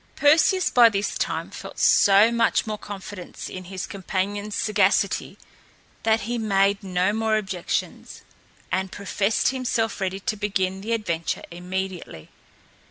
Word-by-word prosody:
Perseus 325 +5 +4
by 240 -2 +7
this 200 -1 -2
time - - -2
felt - - -9
so 205 +3 +5
much 235 0 +2
confidence 205 -3 -7
in 185 0 -8
his 185 0 -5
companion's 200 +2 -3
sagacity 200 -1 +1 0.6
that 225 0 +2
he 240 +1 -3
made 200 -1 +2
no 185 +1 0
more 220 0 +1
objections, 190 -4 -4 0.5
and 190 0 -1
professed 200 +1 0
himself 235 -5 -1
ready 190 0 -2
to 215 - -2
begin 195 -2 -1
the 225 +3 -2
adventure 170 -8 -2
immediately. 180 - -5
200 Hz, 125 wpm, -24 LUFS, 190-220 Hz, 0.6 s, by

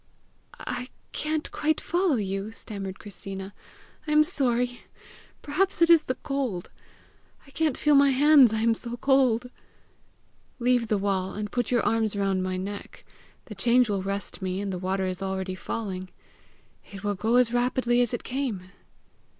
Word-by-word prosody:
"I 250 +1 -5 0.2
can't 310 0 -2
quite 310 0 0
follow 350 -3 +1
you," 195 -1 -3
stammered 200 -4 -6
Christina. 195 -1 -8 0.5
"I - - -1
am 300 0 +6
sorry. 245 -4 0 0.6
Perhaps 370 +7 0
it 335 0 +5
is 325 -2 +6
the 255 - -1
cold. 260 -12 -3 0.7
I 275 - -17
can't 310 -1 0
feel 300 - +3
my 280 0 +6
hands, 275 -2 +6
I 220 0 -1
am 230 0 +3
so 235 +1 -6
cold." 250 -2 +2 1.1
"Leave 245 -1 +2
the 210 - +1
wall, 195 -1 -1
and 210 0 -4
put 245 -2 -1
your 240 -2 +1
arms 220 -2 +1
round 195 -2 0
my 185 0 -2
neck. 200 +2 -7 0.4
The 215 - -9
change 235 +3 +3
will 200 -2 0
rest 200 +1 -4
me, 185 0 -2
and 200 -1 -3
the 180 - -4
water 190 +1 -1
is 185 +1 -3
already 190 -1 -3
falling! 185 -1 -5 0.8
It 195 -1 -9
will 205 0 0
go 220 +5 0
as 245 -1 +4
rapidly 245 0 +2
as 240 - +1
it 240 - -4
came!" 235 -9 -3
225 Hz, 165 wpm, -26 LUFS, 195-260 Hz, 1.1 s, am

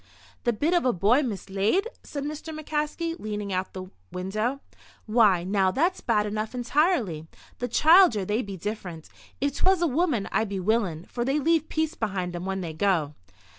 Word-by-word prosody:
"The 240 - +4
bit 300 +10 0
of 350 - +3
a 250 -1 +2
boy 210 - +3
mislaid?" 210 - 0
said 285 -2 -6
Mr. 305 +1 -6
McCaskey, 310 +2 -2
leaning 210 -2 -4
out 185 0 -1
of - - -36
the 185 0 -8 0.2
window. 215 +9 -2 0.4
"Why, 215 -6 +4
now, 190 0 +2
that's 340 - 0
bad 215 -3 +1
enough, 215 +3 -3
entirely. 245 - +1 0.3
The 245 - -1
childer, 300 - +5
they 210 +5 0
be 200 -4 -7
different. 180 -5 -6 0.3
If 280 0 -1
'twas 380 -1 +3
a 345 - +2
woman 295 - +1
I'd 220 - +1
be 195 -1 -3
willin', 185 -5 0
for 240 - -3
they 270 +4 +1
leave 320 +1 +1
peace 315 0 -1
behind 190 - -3
'em 175 +1 -5
when 190 0 -2
they 165 -3 -5
go." 160 -4 +1
220 Hz, 180 wpm, -26 LUFS, 190-300 Hz, 0.4 s, childer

